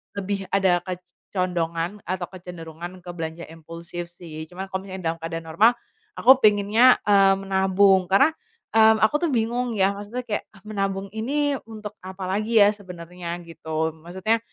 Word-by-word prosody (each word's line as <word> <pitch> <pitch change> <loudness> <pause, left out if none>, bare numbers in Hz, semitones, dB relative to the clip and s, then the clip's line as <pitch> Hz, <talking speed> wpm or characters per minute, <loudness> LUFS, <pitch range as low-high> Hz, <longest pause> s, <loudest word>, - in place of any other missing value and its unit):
lebih 200 -1 -3
ada 185 -3 +3
kecondongan 180 0 -3
atau 180 0 -3
kecenderungan 175 0 -9
ke 175 - -10
belanja 165 0 -6
impulsif 170 +2 -8
sih. 160 -2 -9
Cuma 190 +2 -8
kalo 190 +1 -4
misalnya 170 -3 -3
keadaan 165 0 -5
normal 220 +9 +5 0.4
aku 255 - +6
pengennya, 215 +3 +5
eee, 195 -1 +5
menabung. 190 -1 +3
Karena, 275 +12 +5 0.4
mmm, 220 0 +6
aku 220 - +4
tuh - - -1
bingung 240 0 0
ya, 195 0 +3
maksudnya 205 +5 -6
kayak, 210 -4 -3 0.2
"Menabung 195 -2 -2
ini 285 +6 0 0.2
untuk 215 -2 -7
apalagi 195 +4 -1
ya 200 - +6
sebenarnya?" 180 -3 -8
gitu. 160 -1 -3
Maksudnya, 190 +7 -1
190 Hz, 140 wpm, -24 LUFS, 175-210 Hz, 0.4 s, aku